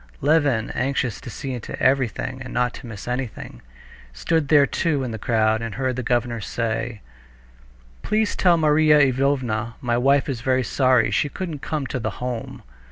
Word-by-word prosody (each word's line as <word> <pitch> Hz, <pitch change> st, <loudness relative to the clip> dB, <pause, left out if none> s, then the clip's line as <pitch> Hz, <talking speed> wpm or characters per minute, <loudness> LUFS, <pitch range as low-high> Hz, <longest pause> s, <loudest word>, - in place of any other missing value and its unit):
Levin, 140 Hz, -6 st, +2 dB
anxious 125 Hz, -4 st, -1 dB
to -, -, -8 dB
see 135 Hz, +3 st, -5 dB
into 120 Hz, -3 st, -6 dB
everything 130 Hz, 0 st, 0 dB
and 130 Hz, -, -7 dB
not 125 Hz, 0 st, 0 dB
to 125 Hz, -, -10 dB
miss 110 Hz, -2 st, -9 dB
anything, 125 Hz, -, -5 dB, 0.5 s
stood 145 Hz, -, 0 dB
there 145 Hz, -1 st, +6 dB
too 145 Hz, 0 st, -1 dB
in 125 Hz, -, -3 dB
the 110 Hz, -, -5 dB
crowd, 110 Hz, 0 st, +1 dB
and 115 Hz, -2 st, -5 dB
heard 130 Hz, -1 st, -1 dB
the 130 Hz, -, -2 dB
governor 120 Hz, -1 st, -1 dB
say: 115 Hz, +1 st, -3 dB, 1.0 s
"Please 215 Hz, 0 st, 0 dB
tell 175 Hz, -2 st, +4 dB
Marya 155 Hz, -1 st, +4 dB
Ivanovna 130 Hz, -5 st, +1 dB
my 120 Hz, -1 st, 0 dB
wife 140 Hz, +2 st, +3 dB
is 130 Hz, -5 st, -3 dB
very 130 Hz, +1 st, +1 dB
sorry 130 Hz, 0 st, +2 dB
she 145 Hz, -, +1 dB
couldn't 165 Hz, -2 st, -5 dB
come 150 Hz, 0 st, -3 dB
to 130 Hz, -, -3 dB
the 110 Hz, -3 st, -4 dB
Home." 125 Hz, -2 st, -5 dB
130 Hz, 170 wpm, -23 LUFS, 115-140 Hz, 1.0 s, there